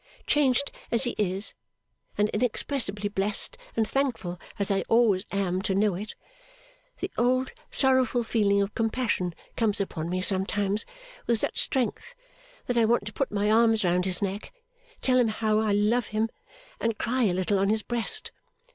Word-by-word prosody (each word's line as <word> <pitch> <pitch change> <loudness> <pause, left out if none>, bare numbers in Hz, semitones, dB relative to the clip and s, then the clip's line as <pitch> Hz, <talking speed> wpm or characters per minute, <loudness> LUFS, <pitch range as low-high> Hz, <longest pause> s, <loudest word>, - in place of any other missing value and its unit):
Changed 280 -1 +2 0.2
as 235 - +3
he 240 - 0
is, 195 0 0 0.6
and 210 - +3
inexpressibly 215 -2 0
blest 200 0 +1 0.2
and 225 -1 +1
thankful 235 -11 -2 0.2
as 200 0 -1
I 195 - +2
always 225 -5 +3
am 190 -2 -1
to 195 -1 -1
know 205 0 +2
it, 210 +5 -6 0.9
the - - -3
old 255 +2 +2 0.2
sorrowful 260 -3 +2
feeling 200 -3 +2
of 200 - -5
compassion 225 -6 -1 0.2
comes 215 -3 0
upon 170 -4 -3
me 185 +1 -1
sometimes 195 +2 0 0.4
with 235 - +3
such - - -1
strength 265 - -2 0.5
that 245 -1 +1
I 230 - +4
want 235 -2 +2
to 210 - -7
put 275 - -2
my 210 0 +1
arms 225 -1 +4
round 180 0 +2
his 185 0 +2
neck, 200 +1 -4 0.5
tell 255 -1 +4
him 240 - +4
how 215 0 +1
I 220 -1 +1
love 210 +3 +2
him, 215 +1 -1 0.5
and 230 -2 -1
cry 250 +1 0
a 190 - +2
little 185 +2 +1
on 195 +1 +2
his 215 0 +1
breast. 240 - 0
215 Hz, 165 wpm, -27 LUFS, 200-240 Hz, 0.9 s, I